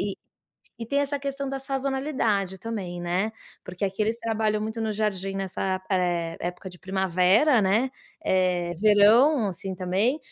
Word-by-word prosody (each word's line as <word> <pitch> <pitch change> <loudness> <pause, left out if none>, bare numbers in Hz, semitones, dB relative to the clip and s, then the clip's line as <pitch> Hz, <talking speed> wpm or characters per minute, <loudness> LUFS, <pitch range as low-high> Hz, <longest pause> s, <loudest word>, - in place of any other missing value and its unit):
e 200 0 -2 0.7
e - - -5
tem 280 +5 0
essa 285 0 -1
questão 275 0 -4
da 270 0 -3
sazonalidade 265 -8 -1
também, 185 -5 -5
né. 185 +5 -1 0.3
Porque 180 +2 -5
aqui 195 +1 -3
eles 220 +2 +1
trabalham 220 -2 0
muito 220 +1 -4
no 220 -1 -1
jardim 195 -2 -2
nessa, 190 0 -2
eh, 175 -3 0
época 180 +2 -5
de 180 - -13
primavera, 190 - +3
né, 215 +7 +2 0.3
eh, 180 -2 +1
verão, 215 +4 +5
assim, 190 +1 -5
também. 190 - 0
205 Hz, 150 wpm, -26 LUFS, 185-230 Hz, 0.7 s, verão